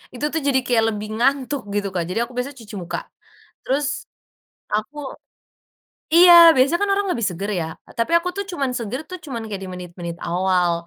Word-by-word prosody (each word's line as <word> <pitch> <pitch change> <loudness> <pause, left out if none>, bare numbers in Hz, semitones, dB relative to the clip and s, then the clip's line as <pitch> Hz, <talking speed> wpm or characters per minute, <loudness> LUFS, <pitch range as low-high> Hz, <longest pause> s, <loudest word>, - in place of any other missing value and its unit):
itu 250 - -8
tuh 320 - +1
jadi 265 -2 +3
kayak 235 -3 +3
lebih 210 +1 -5
ngantuk, 270 -1 0
gitu, 205 -1 0
Kak. 180 -2 -1
Jadi 185 +5 -2
aku 240 - -8
biasa 255 +3 -3
cuci 225 -4 -11
muka, 175 -2 -4 0.6
terus, 275 +1 -1 0.7
aku 215 +8 -2 1.2
iya, 350 +1 +9 0.2
biasa 260 +5 +4
kan 405 - +1
orang 400 0 0
lebih 235 -7 -2
seger 190 +4 -5
ya, 160 - -2 0.3
tapi 230 +8 0
aku 345 +1 -4
tuh 400 - -2
cuman 275 -6 -1
seger 235 +3 -4
tuh 365 - -5
cuman 240 -5 -5
kayak 200 -2 -5
di - - -7
menit-menit 175 -1 -7
awal. 180 0 +1
235 Hz, 180 wpm, -21 LUFS, 190-280 Hz, 1.2 s, iya